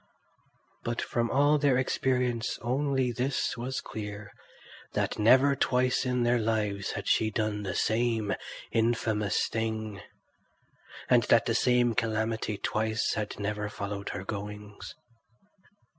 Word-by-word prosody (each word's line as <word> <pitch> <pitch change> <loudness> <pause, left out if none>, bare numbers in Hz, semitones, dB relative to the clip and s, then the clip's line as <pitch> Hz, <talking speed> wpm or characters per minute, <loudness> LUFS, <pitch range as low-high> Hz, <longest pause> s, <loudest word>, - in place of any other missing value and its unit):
But 120 0 -2
from 120 -1 -1
all 145 +2 +4
their 140 -3 +3
experience 125 -2 0
only 130 0 +1
this 125 +3 -1
was 125 +2 -3
clear, 105 -1 -7 0.6
that - - -1
never 130 +6 +5
twice 125 0 +1
in 125 -1 +1
their 120 0 +3
lives 105 -3 -1
had - - -5
she 110 - +3
done 110 -1 -1
the 95 -4 -4
same 110 -2 +1 0.4
infamous 110 -2 +1
thing, 110 -3 -3 1.1
and - - +5
that - - +4
the - - +1
same 125 -1 +3
calamity 110 -1 -1
twice 110 +3 0
had 105 -1 -4
never 105 0 -2
followed 100 -1 -5
her 95 - -5
goings. 105 0 -7
110 Hz, 125 wpm, -29 LUFS, 105-125 Hz, 1.1 s, never